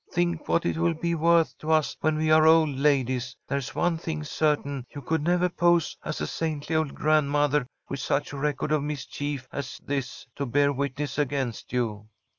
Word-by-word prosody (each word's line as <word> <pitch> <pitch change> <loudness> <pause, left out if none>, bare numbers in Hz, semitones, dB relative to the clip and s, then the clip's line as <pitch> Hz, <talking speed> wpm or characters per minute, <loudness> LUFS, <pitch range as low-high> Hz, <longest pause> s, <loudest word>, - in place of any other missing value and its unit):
Think 175 -2 -1
what 170 - +1
it - - 0
will 170 0 +1
be 170 +2 -1
worth 165 0 +3
to 155 - -6
us 155 -2 +2
when 155 0 +2
we 155 0 +1
are 155 0 +6
old 160 -1 +6
ladies. 130 -3 +1
There's 140 -1 -3
one 175 -2 +1
thing 160 -2 -4
certain, 145 -4 -1
you 145 - -8
could 160 +4 0
never 175 +3 +2
pose 175 -2 +2
as 155 - -4
a - - -1
saintly 160 -1 -3
old 155 -3 0
grandmother 145 -2 +2 0.2
with 135 - -4
such 145 - -1
a - - -5
record 150 +1 -1
for 155 -1 +2
mischief 145 -1 -4
as 140 -3 -5
this 135 -2 -3
to 140 - -2
bear 140 +3 +3
witness 140 +1 -3
against 135 -4 -2
you." 110 -4 -2
150 Hz, 190 wpm, -26 LUFS, 140-160 Hz, 0.2 s, are